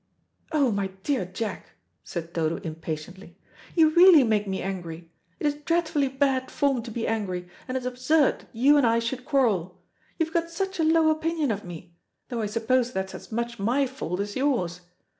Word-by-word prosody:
"Oh, 285 Hz, -6 st, +3 dB
my 200 Hz, -2 st, 0 dB, 0.2 s
dear 270 Hz, -7 st, 0 dB
Jack," 190 Hz, +3 st, -5 dB, 0.3 s
said 170 Hz, +6 st, -6 dB
Dodo 165 Hz, -1 st, 0 dB
impatiently, 160 Hz, +3 st, -7 dB, 0.4 s
"you 320 Hz, -3 st, +6 dB
really 345 Hz, -3 st, +8 dB
make 215 Hz, -3 st, +1 dB
me 190 Hz, 0 st, -2 dB
angry. 170 Hz, -3 st, -6 dB, 0.3 s
It -, -, -3 dB
is 295 Hz, -, +3 dB
dreadfully 300 Hz, -1 st, 0 dB
bad 265 Hz, -1 st, 0 dB
form 275 Hz, -4 st, +1 dB
to 235 Hz, -, -8 dB
be 230 Hz, 0 st, -3 dB
angry, 185 Hz, -5 st, -2 dB, 0.2 s
and 255 Hz, 0 st, -2 dB
it -, -, -3 dB
is -, -, -9 dB
absurd 255 Hz, +4 st, +2 dB
that -, -, -19 dB
you 270 Hz, +6 st, +4 dB
and 270 Hz, -4 st, +4 dB
I 230 Hz, 0 st, +3 dB
should 240 Hz, +2 st, -3 dB
quarrel. 205 Hz, -, +1 dB, 0.4 s
You've 320 Hz, -1 st, -1 dB
got 335 Hz, 0 st, 0 dB
such 380 Hz, +2 st, -3 dB
a -, -, +3 dB
low 320 Hz, 0 st, +4 dB
opinion 315 Hz, -3 st, 0 dB
of 205 Hz, -1 st, -3 dB
me; 175 Hz, -1 st, -10 dB, 0.4 s
though 240 Hz, -3 st, -2 dB
I 215 Hz, -, -1 dB
suppose 235 Hz, +3 st, +1 dB
that's 190 Hz, -3 st, -3 dB
as -, -, -10 dB
much 235 Hz, 0 st, -3 dB
my 245 Hz, +8 st, +2 dB
fault 190 Hz, -9 st, -4 dB
as 205 Hz, 0 st, -3 dB
yours. 235 Hz, -11 st, 0 dB
240 Hz, 190 wpm, -26 LUFS, 190-285 Hz, 0.4 s, really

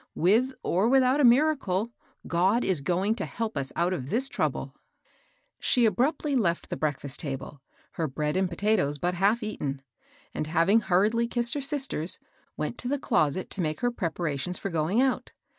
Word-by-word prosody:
With 230 Hz, +10 st, +2 dB
or 195 Hz, +6 st, +2 dB
without 265 Hz, +1 st, +4 dB
a -, -, +4 dB
miracle, 240 Hz, -6 st, +3 dB, 0.3 s
God 190 Hz, +8 st, +2 dB
is 180 Hz, -7 st, 0 dB
going 185 Hz, +7 st, +1 dB
to 195 Hz, -, -2 dB
help 225 Hz, -2 st, -4 dB
us 135 Hz, -1 st, -3 dB
out 175 Hz, +2 st, +1 dB
of 135 Hz, -6 st, -5 dB
this 250 Hz, -, +1 dB
trouble." -, -, -2 dB, 0.9 s
She 245 Hz, -3 st, +3 dB
abruptly 280 Hz, +6 st, +1 dB
left 175 Hz, -9 st, 0 dB
the -, -, -1 dB
breakfast 145 Hz, -2 st, -3 dB
table, 135 Hz, -1 st, -5 dB, 0.3 s
her 160 Hz, -, -2 dB
bread 150 Hz, +2 st, -2 dB
and 190 Hz, -1 st, +1 dB
potatoes 170 Hz, -6 st, +1 dB
but 175 Hz, +5 st, -1 dB
half 200 Hz, +6 st, +2 dB
eaten; 140 Hz, -10 st, -4 dB, 0.5 s
and 155 Hz, -, -3 dB
having 170 Hz, +7 st, +3 dB
hurriedly 215 Hz, +5 st, +2 dB
kissed 240 Hz, 0 st, +1 dB
her 290 Hz, -, -2 dB
sisters, 265 Hz, -, 0 dB, 0.4 s
went 155 Hz, +10 st, -3 dB
to 245 Hz, -, -3 dB
the 285 Hz, +3 st, 0 dB
closet 185 Hz, -, 0 dB
to 195 Hz, -, -1 dB
make 155 Hz, -2 st, -2 dB
her 245 Hz, -, +1 dB
preparations 170 Hz, -, -3 dB
for 195 Hz, -, -4 dB
going 165 Hz, +7 st, +1 dB
out. 260 Hz, 0 st, 0 dB
190 Hz, 175 wpm, -27 LUFS, 160-240 Hz, 0.9 s, without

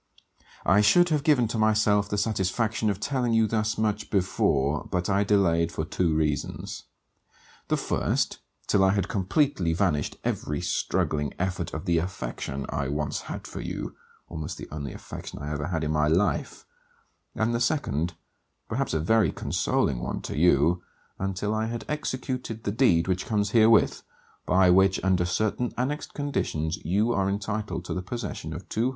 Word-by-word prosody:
I 100 Hz, +3 st, +5 dB
should 175 Hz, +12 st, +5 dB
have 150 Hz, -3 st, +1 dB
given 145 Hz, -7 st, +4 dB
to 115 Hz, -, -2 dB
myself 105 Hz, -1 st, +3 dB
the 105 Hz, -, -1 dB
satisfaction 110 Hz, +1 st, 0 dB
of 100 Hz, -1 st, -1 dB
telling 125 Hz, -1 st, 0 dB
you 115 Hz, 0 st, +4 dB
thus 110 Hz, 0 st, 0 dB
much 105 Hz, -1 st, -1 dB
before, 75 Hz, -7 st, +1 dB
but 90 Hz, +2 st, 0 dB
I 100 Hz, +1 st, +3 dB
delayed 85 Hz, -5 st, +2 dB
for 80 Hz, -, -3 dB
two 85 Hz, -1 st, 0 dB
reasons; 75 Hz, -2 st, -2 dB, 0.8 s
the -, -, +1 dB
first, -, -, 0 dB, 0.3 s
till 100 Hz, -, +3 dB
I 95 Hz, 0 st, +4 dB
had 100 Hz, -2 st, 0 dB
completely 95 Hz, -, +1 dB
banished 85 Hz, -6 st, 0 dB
every 75 Hz, -1 st, -2 dB
struggling 75 Hz, -2 st, -1 dB
effort 90 Hz, -3 st, -2 dB
of 80 Hz, -, -5 dB
the 85 Hz, -1 st, +3 dB
affection 70 Hz, -6 st, -4 dB
I 70 Hz, -, -2 dB
once 75 Hz, +1 st, -2 dB
had -, -, -5 dB
for -, -, -6 dB
you, -, -, -5 dB, 0.3 s
almost 80 Hz, -3 st, -5 dB
the -, -, -8 dB
only 70 Hz, -3 st, -5 dB
affection -, -, -8 dB
I 75 Hz, +1 st, -5 dB
ever 75 Hz, 0 st, -3 dB
had 80 Hz, -3 st, -2 dB
in 75 Hz, -, -1 dB
my 75 Hz, -1 st, +2 dB
life; 90 Hz, +6 st, 0 dB, 0.7 s
and 110 Hz, +2 st, +1 dB
the 115 Hz, -, +1 dB
second, 85 Hz, -, 0 dB, 0.5 s
perhaps -, -, -1 dB
a -, -, +2 dB
very 100 Hz, +2 st, +3 dB
consoling 65 Hz, -4 st, 0 dB
one -, -, -3 dB
to -, -, -5 dB
you, 85 Hz, +2 st, +4 dB, 0.4 s
until 95 Hz, +2 st, -1 dB
I 110 Hz, 0 st, 0 dB
had 115 Hz, -2 st, -5 dB
executed 130 Hz, -6 st, -3 dB
the 100 Hz, -, -1 dB
deed 100 Hz, -8 st, +3 dB
which 95 Hz, 0 st, -1 dB
comes 105 Hz, -2 st, 0 dB
herewith, 115 Hz, -1 st, +5 dB, 0.5 s
by 95 Hz, 0 st, +5 dB
which 95 Hz, +1 st, +4 dB
under 95 Hz, -2 st, +2 dB
certain 110 Hz, +6 st, 0 dB
annexed 135 Hz, +5 st, -2 dB
conditions 80 Hz, -, -1 dB
you 105 Hz, +8 st, +1 dB
are 95 Hz, -2 st, +1 dB
entitled 105 Hz, -2 st, -3 dB
to -, -, -3 dB
the 90 Hz, -, -2 dB
possession 100 Hz, -5 st, -5 dB
of 85 Hz, +4 st, -7 dB
200l. 115 Hz, +3 st, 0 dB
95 Hz, 170 wpm, -26 LUFS, 80-110 Hz, 0.8 s, I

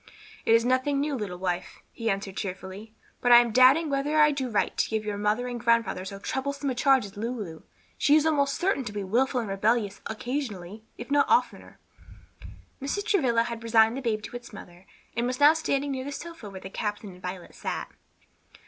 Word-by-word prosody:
"It 225 Hz, -, +6 dB
is 230 Hz, +1 st, +3 dB
nothing 260 Hz, +3 st, +1 dB
new, 290 Hz, +1 st, -1 dB
little 205 Hz, -8 st, -4 dB
wife," 180 Hz, -1 st, -3 dB
he 230 Hz, -1 st, -3 dB
answered 195 Hz, -1 st, -3 dB
cheerfully; 195 Hz, +3 st, -6 dB, 0.3 s
"but 245 Hz, -, +3 dB
I 240 Hz, -, +11 dB
am 240 Hz, -1 st, +4 dB
doubting 260 Hz, +7 st, +6 dB
whether 285 Hz, +2 st, 0 dB
I 300 Hz, 0 st, +6 dB
do 270 Hz, -3 st, -2 dB
right 215 Hz, -, 0 dB
to -, -, 0 dB
give 220 Hz, -1 st, -2 dB
your 205 Hz, -1 st, -3 dB
mother 210 Hz, +4 st, 0 dB
and 245 Hz, -1 st, -4 dB
grandfather 230 Hz, -5 st, +1 dB
so 195 Hz, +1 st, -6 dB
troublesome 280 Hz, +6 st, -3 dB
a -, -, -1 dB
charge 265 Hz, -1 st, +3 dB
as 200 Hz, +1 st, -12 dB
Lulu. 210 Hz, -8 st, -5 dB, 0.4 s
She 290 Hz, -, +5 dB
is 310 Hz, 0 st, +4 dB
almost 280 Hz, -3 st, +2 dB
certain 360 Hz, -7 st, 0 dB
to 210 Hz, -, -4 dB
be 205 Hz, -1 st, -3 dB
wilful 245 Hz, +6 st, +1 dB
and 225 Hz, -, -5 dB
rebellious 205 Hz, +1 st, 0 dB
occasionally, 220 Hz, -5 st, -5 dB
if 240 Hz, +4 st, -8 dB
not 285 Hz, 0 st, +3 dB
oftener." 465 Hz, -, +1 dB, 1.0 s
Mrs. 340 Hz, +10 st, -2 dB
Travilla 245 Hz, -, +2 dB
had 235 Hz, -1 st, -5 dB
resigned 225 Hz, 0 st, +4 dB
the 270 Hz, -, -4 dB
babe 220 Hz, -4 st, -1 dB
to -, -, -8 dB
its 245 Hz, -1 st, -8 dB
mother, 180 Hz, -3 st, -12 dB, 0.3 s
and 235 Hz, +1 st, 0 dB
was 255 Hz, 0 st, -3 dB
now 295 Hz, +2 st, +8 dB
standing 285 Hz, -3 st, -1 dB
near 260 Hz, -1 st, -3 dB
the 285 Hz, -, -5 dB
sofa 330 Hz, -7 st, -8 dB
where 190 Hz, -1 st, -9 dB
the 190 Hz, -, -9 dB
captain 210 Hz, -1 st, -4 dB
and 180 Hz, 0 st, -15 dB
Violet 180 Hz, -1 st, -7 dB
sat. -, -, -5 dB
235 Hz, 205 wpm, -27 LUFS, 205-275 Hz, 1.0 s, I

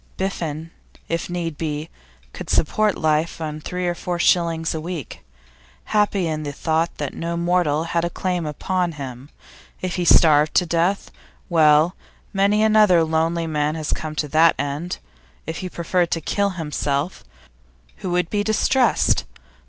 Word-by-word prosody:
Biffen, 165 Hz, -4 st, -3 dB, 0.4 s
if 165 Hz, +1 st, -2 dB
need 170 Hz, -3 st, -4 dB
be, 155 Hz, -1 st, -3 dB, 0.5 s
could -, -, -8 dB
support 210 Hz, +6 st, +2 dB
life 155 Hz, +1 st, 0 dB
on 155 Hz, -1 st, -4 dB
three 180 Hz, +3 st, -3 dB
or 175 Hz, -, +1 dB
four 175 Hz, 0 st, -4 dB
shillings 170 Hz, -2 st, +2 dB
a 160 Hz, -, -4 dB
week, 165 Hz, -5 st, -6 dB, 0.6 s
happy 205 Hz, -3 st, +1 dB
in 155 Hz, -1 st, -2 dB
the 145 Hz, -1 st, -4 dB
thought 160 Hz, +3 st, -1 dB
that 145 Hz, -2 st, -4 dB
no 170 Hz, 0 st, -3 dB
mortal 170 Hz, -3 st, +1 dB
had 170 Hz, 0 st, -1 dB
a 175 Hz, -, 0 dB
claim 180 Hz, -2 st, -2 dB
upon 175 Hz, +3 st, -1 dB
him. 135 Hz, -2 st, -8 dB, 0.5 s
If 185 Hz, 0 st, -3 dB
he 175 Hz, -, 0 dB
starved 155 Hz, -2 st, +5 dB
to 180 Hz, -, +4 dB
death 170 Hz, +4 st, 0 dB, 0.4 s
well, 155 Hz, +1 st, +4 dB, 0.4 s
many 200 Hz, +2 st, +3 dB
another 210 Hz, -6 st, +5 dB
lonely 165 Hz, +1 st, 0 dB
man 150 Hz, -1 st, -1 dB
has 155 Hz, -1 st, -2 dB
come 155 Hz, -1 st, -5 dB
to 155 Hz, -, -1 dB
that 160 Hz, +3 st, +5 dB
end. 145 Hz, +5 st, -3 dB, 0.5 s
If 160 Hz, +1 st, -4 dB
he 185 Hz, -, -5 dB
preferred 175 Hz, 0 st, 0 dB
to 165 Hz, -, 0 dB
kill 200 Hz, +5 st, 0 dB
himself, 150 Hz, 0 st, -2 dB, 0.7 s
who 185 Hz, -, -5 dB
would 175 Hz, -1 st, 0 dB
be 205 Hz, -1 st, +1 dB
distressed? 235 Hz, +4 st, +2 dB
165 Hz, 155 wpm, -22 LUFS, 155-180 Hz, 0.7 s, starved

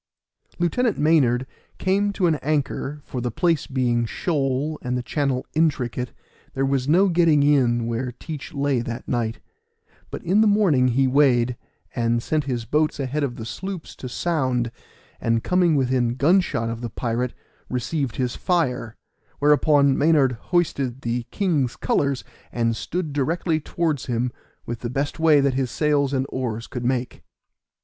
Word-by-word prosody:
Lieutenant 215 Hz, +7 st, +1 dB
Maynard 135 Hz, -5 st, +3 dB, 0.3 s
came 200 Hz, +2 st, +1 dB
to 195 Hz, -, 0 dB
an 165 Hz, -, +4 dB
anchor, 145 Hz, 0 st, -2 dB
for 125 Hz, -, -5 dB
the 120 Hz, -, -1 dB
place 165 Hz, +7 st, 0 dB
being 120 Hz, -3 st, 0 dB
shoal, 145 Hz, 0 st, -1 dB
and 125 Hz, -1 st, -2 dB
the 125 Hz, -, -3 dB
channel 135 Hz, -1 st, -1 dB
intricate, 130 Hz, -6 st, 0 dB, 0.4 s
there 135 Hz, 0 st, +1 dB
was 135 Hz, -1 st, 0 dB
no 185 Hz, +6 st, +5 dB
getting 165 Hz, -5 st, +4 dB
in 125 Hz, -5 st, +3 dB
where 120 Hz, +2 st, -2 dB
Teach 150 Hz, +4 st, -8 dB
lay 140 Hz, -3 st, 0 dB
that 120 Hz, +1 st, -5 dB
night; 115 Hz, -3 st, -1 dB, 0.7 s
but -, -, -7 dB
in 195 Hz, +5 st, +3 dB
the 220 Hz, -, +5 dB
morning 190 Hz, -12 st, +4 dB
he 130 Hz, +2 st, +2 dB
weighed, 125 Hz, -3 st, +3 dB, 0.4 s
and 115 Hz, -1 st, +1 dB
sent 155 Hz, -2 st, 0 dB
his 120 Hz, -4 st, -2 dB
boat 150 Hz, +6 st, +1 dB
ahead 140 Hz, +2 st, -1 dB
of 125 Hz, -4 st, -2 dB
the 110 Hz, -, -7 dB
sloops 185 Hz, -, -6 dB
to 130 Hz, -, -7 dB
sound, 130 Hz, -7 st, 0 dB, 0.5 s
and 115 Hz, 0 st, 0 dB
coming 180 Hz, -3 st, +3 dB
within 125 Hz, -3 st, +1 dB
gun 160 Hz, +9 st, +4 dB
shot 115 Hz, -9 st, -2 dB
of 115 Hz, 0 st, -4 dB
the 120 Hz, -, -4 dB
pirate, 120 Hz, +2 st, -2 dB, 0.3 s
received 130 Hz, +1 st, -2 dB
his 125 Hz, -2 st, -1 dB
fire; 125 Hz, -10 st, -1 dB, 0.4 s
whereupon 145 Hz, -1 st, +4 dB
Maynard 145 Hz, -3 st, +4 dB, 0.2 s
hoisted 140 Hz, -8 st, 0 dB
the 120 Hz, -1 st, -2 dB
king's 155 Hz, -, 0 dB
colors, 140 Hz, -2 st, 0 dB, 0.3 s
and 115 Hz, -1 st, 0 dB
stood 160 Hz, +5 st, -3 dB
directly 160 Hz, +3 st, 0 dB
towards 155 Hz, -3 st, -2 dB
him 120 Hz, 0 st, -1 dB, 0.3 s
with 120 Hz, 0 st, -5 dB
the 120 Hz, -, -4 dB
best 140 Hz, +5 st, -2 dB
way 160 Hz, -2 st, +5 dB
that 140 Hz, -1 st, +2 dB
his 130 Hz, -1 st, -1 dB
sails 145 Hz, 0 st, +1 dB
and 130 Hz, -1 st, 0 dB
oars 115 Hz, -3 st, -3 dB
could 125 Hz, -, -6 dB
make. 125 Hz, 0 st, -1 dB
135 Hz, 160 wpm, -23 LUFS, 120-155 Hz, 0.7 s, no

